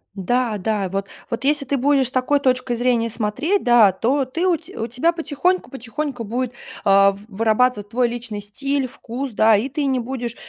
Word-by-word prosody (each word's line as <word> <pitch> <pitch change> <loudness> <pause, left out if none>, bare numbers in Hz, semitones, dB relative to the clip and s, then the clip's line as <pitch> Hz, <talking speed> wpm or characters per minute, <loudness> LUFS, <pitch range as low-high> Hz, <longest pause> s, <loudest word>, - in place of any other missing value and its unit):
Да 230 +3 0
да, 200 -1 -1
вот 195 +1 -3 0.2
вот 230 0 -4
если 285 0 +2
ты 275 +1 0
будешь 270 0 +3
с 255 - -6
такой 260 +3 +1
точкой 255 -2 0
зрения 235 -1 +1
смотреть, 255 - -1
да, 240 -5 +6
то 260 +9 0
ты 330 +8 -1
у 355 - +4
те 320 0 -12
у 225 - -2
тебя 250 +9 +1
потихоньку 340 +2 -1
потихоньку 265 0 -5
будет, 245 +3 -3 0.3
а, 195 0 +5
в 200 +1 -12
вырабатываться 220 0 +1
твой 245 +1 +2
личный 235 -3 -5
стиль, 275 +6 -2
вкус, 250 +2 -6
да, 220 +1 +5
и 235 +7 -2
ты 285 +1 -2
не 260 -2 +1
будешь 240 -1 -4
245 Hz, 195 wpm, -21 LUFS, 220-275 Hz, 0.3 s, да